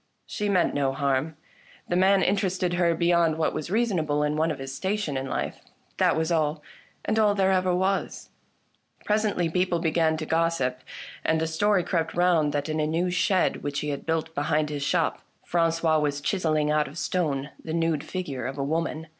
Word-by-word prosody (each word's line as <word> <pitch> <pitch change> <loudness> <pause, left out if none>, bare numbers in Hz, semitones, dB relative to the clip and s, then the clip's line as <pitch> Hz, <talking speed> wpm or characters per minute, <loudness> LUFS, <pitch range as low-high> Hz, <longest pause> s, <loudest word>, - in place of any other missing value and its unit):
She 210 0 -3
meant 185 -3 +2
no 135 -2 0
harm; 140 +2 -1 0.5
the 175 - -1
man 190 +1 +4
interested 185 -2 0
her 175 -1 +2
beyond 170 -1 +2
what 160 - 0
was 155 +1 -4
reasonable 175 -9 +1
in 150 0 0
one 160 +2 +1
of 155 - -3
his 135 0 -6
station 190 -1 -2
in 135 0 -2
life. - - -3 0.4
That - - +3
was 160 +1 -1
all, 155 -2 0 0.4
and 220 +1 +1
all 210 -2 +4
there 190 -1 +2
ever 185 -1 +2
was. 190 +2 -1 0.8
Presently 210 -5 +1
people 180 +1 0
began 160 -1 +1
to 155 - -4
gossip, 160 -6 0 0.4
and 160 - +1
a 160 - 0
story 190 +4 +2
crept 165 -2 -1
round 170 -4 +3
that, 145 0 -2
in 155 0 -2
a 150 - +1
nevv^ 175 +3 0
shed 185 0 +2
which 145 0 -3
he 150 - -3
had 140 +1 -5
built 160 0 -1
behind 150 0 0
his 145 -1 -4
shop, 165 +3 0 0.2
Frangois 165 -2 +2
was 145 -1 -1
chiselling 155 -2 0
out 150 0 +2
of 150 - -11
stone 145 -7 -1
the 160 - -6
nude 165 -2 0
figure 140 -10 -4
of 135 +2 -6
a 140 - -1
woman. 160 +2 -2
160 Hz, 190 wpm, -26 LUFS, 150-180 Hz, 0.8 s, man